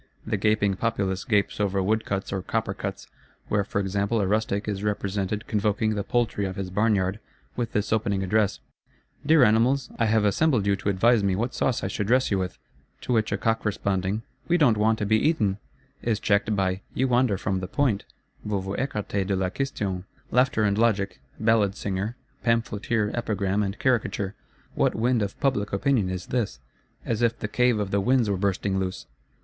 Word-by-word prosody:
The 110 - -1
gaping 105 -1 +2
populace 100 -5 -1
gapes 105 -3 +1
over 100 -1 +1
Wood 110 +3 +1
cuts 95 0 -3
or 95 - -1
Copper - - -2
cuts; - - -5 0.4
where, 100 - +2
for 100 - -2
example, 100 +3 0
a 100 - +1
Rustic 105 0 0
is 100 -1 -3
represented 100 0 -2
convoking 105 0 0
the 100 -1 -2
poultry 115 -3 0
of 95 -1 -4
his 95 -2 -4
barnyard, 100 -1 +1 0.4
with 120 -2 -3
this 105 +1 0
opening 100 -3 0
address: 105 +1 +1 0.6
'Dear 155 -1 +5
animals, 125 +4 +3
I 115 - +3
have 110 -1 +3
assembled 120 +1 +2
you 100 0 +3
to 100 - -2
advise 110 +3 +3
me 95 -2 +2
what 120 +6 -2
sauce 125 - 0
I - - 0
shall 100 - -2
dress 130 +2 +3
you 100 - +2
with;' 90 -1 -3 0.4
to 125 - -1
which 110 -2 +1
a - - +1
Cock 115 0 0
responding, 100 0 -1 0.2
'We 175 - +3
don't 130 -10 +4
want 110 +1 +3
to 105 - -2
be 110 +2 +3
eaten,' 110 -11 +1 0.4
is 115 -3 0
checked 105 +1 +1
by 95 -1 0
'You 130 - +2
wander 120 -5 +2
from 95 0 -1
the 95 - -4
point 115 -2 0 0.4
(Vous 105 -2 -1
vous 95 +1 -4
écartez 105 -6 -2
de 100 - +1
la 95 -1 -1
question).' 100 -9 -3 0.3
Laughter 125 -3 +3
and 100 0 +1
logic; 100 -5 +1 0.2
ballad 110 -3 +3
singer, 100 +4 -3 0.3
pamphleteer; 115 -2 0
epigram 100 -4 0
and 100 0 -2
caricature: 105 -6 0 0.4
what - - +1
wind 120 +1 +2
of 100 -1 -3
public 105 -7 0
opinion 105 -1 +1
is 90 -1 -4
this,—as 105 - -4
if 115 0 +2
the 105 - -3
Cave 125 +2 +2
of 105 -2 -2
the 100 - +2
Winds 120 -1 +2
were 100 - 0
bursting 95 0 0
loose! 95 -1 -3
105 Hz, 190 wpm, -25 LUFS, 100-115 Hz, 0.6 s, Dear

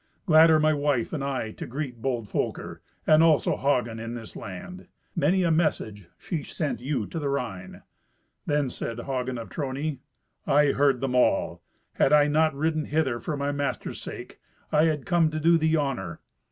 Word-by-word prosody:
Glad 160 -2 +7
are 160 -1 +5
my 155 0 +3
wife 145 -4 0
and 145 -4 -2
I 130 -5 -2
to - - -8
greet 125 -3 -5
bold 120 -4 -2
Folker, - - -3 0.2
and 155 0 +6
also 160 -3 +4
Hagen, 120 -5 0
in 115 +1 -5
this 115 -2 -9
land. 100 - -8 0.3
Many 185 +2 +2
a 170 - +2
message 110 - 0
she 165 -4 -4
sent 145 -4 -3
you 130 -4 -1
to 165 - -5
the 145 -2 -2
Rhine." 115 -10 -4 0.6
Then 145 -3 +1
said 115 +1 -5
Hagen 130 -1 -3
of 115 - -7
Trony, 140 0 -3 0.5
"I 145 0 +4
heard 135 -3 +2
them 135 -2 -1
all. 125 - +2 0.3
Had - - +3
I 150 -1 +6
not 155 0 +2
ridden 155 +1 0
hither 145 -6 0
for 145 +5 -4
my 140 0 -1
masters' 145 -1 -3
sake, - - -8 0.3
I 155 +1 +4
had 155 -4 0
come 170 -3 +3
to 155 0 -3
do 165 +2 +4
thee 160 0 +2
honour." 140 -4 -2
145 Hz, 180 wpm, -26 LUFS, 125-155 Hz, 0.6 s, Glad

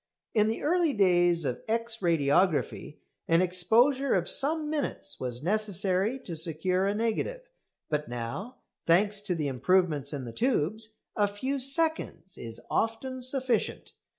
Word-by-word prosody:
In 215 -1 +3
the 225 - -2
early 335 -1 +2
days 175 -4 +3
of 125 -2 -2
X 230 0 0
radiography 165 -2 +1 0.3
an 165 +2 +4
exposure 235 +10 +3
of 175 -2 0
some 305 +2 +2
minutes 300 -2 -3
was 125 0 -5
necessary 200 +2 0
to 170 - -7
secure 175 +4 0
a 200 - 0
negative, 230 - -2 0.4
but 150 -3 -2
now, 120 - -5 0.3
thanks 200 +4 +3
to 200 -4 -2
the 155 -3 -1
improvements 150 +1 +1
in 140 -4 -5
the 115 - -7
tubes, 220 - -1 0.2
a 205 -1 +3
few 260 +8 -3
seconds 275 - -1
is 115 -1 -5
often 255 +4 -1
sufficient. 255 -2 -1
200 Hz, 140 wpm, -28 LUFS, 165-245 Hz, 0.4 s, an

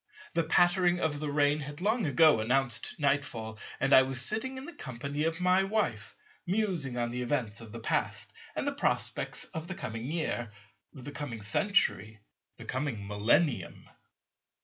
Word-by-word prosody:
The 170 - +2
patterning 175 +2 +4
of 150 -3 0
the 150 0 -3
rain 145 +1 +3
had 145 0 -7
long 215 +1 +1
ago 150 -2 +5
announced 125 +2 +1
nightfall; 130 -7 -1 0.2
and 135 - +2
I 130 - +10
was 130 -1 -1
sitting 225 - -2
in 260 - -6
the 345 - -9
company 140 - -4
of 165 +1 -1
my 180 +1 +4
wife, 195 - -1 0.3
musing 180 - -1
on 120 -1 -1
the 125 +1 -3
events 120 -5 -1
of 115 -2 -11
the - - -7
past - - -1 0.2
and - - -2
the - - +2
prospects - - 0
of 160 +1 -5
the 190 - -4
coming 115 -4 -5
year, 150 -8 -2 0.4
the 140 -1 -9
coming 125 -7 -6
century, 110 - +1 0.4
the - - -10
coming 130 -6 -3
Millennium. 105 - +1
145 Hz, 165 wpm, -30 LUFS, 120-175 Hz, 0.4 s, I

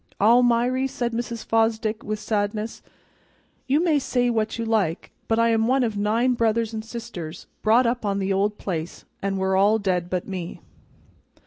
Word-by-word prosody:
"Almiry," 245 +3 +4
said 240 -2 -3
Mrs. 235 -1 -4
Fosdick, 225 0 +1
with 215 +1 -3
sadness, 210 +1 -2 0.9
"you 280 +3 +3
may 315 -5 +3
say 245 -2 0
what 220 -1 -1
you 230 - -2
like, 210 -8 0 0.2
but 225 - +1
I 230 0 +3
am 225 0 +2
one 260 +1 +3
of 225 -3 -1
nine 225 +5 +2
brothers 230 -1 0
and 220 0 -4
sisters 220 -8 -7 0.2
brought 230 +4 +4
up 240 +1 0
on 200 -1 0
the 195 0 0
old 205 +2 0
place, 170 -3 -5 0.2
and 195 0 -1
we're 190 0 +1
all 205 +3 +4
dead 180 -4 -1
but 180 -1 -2
me." 185 -3 -5
220 Hz, 175 wpm, -24 LUFS, 200-235 Hz, 0.9 s, Almiry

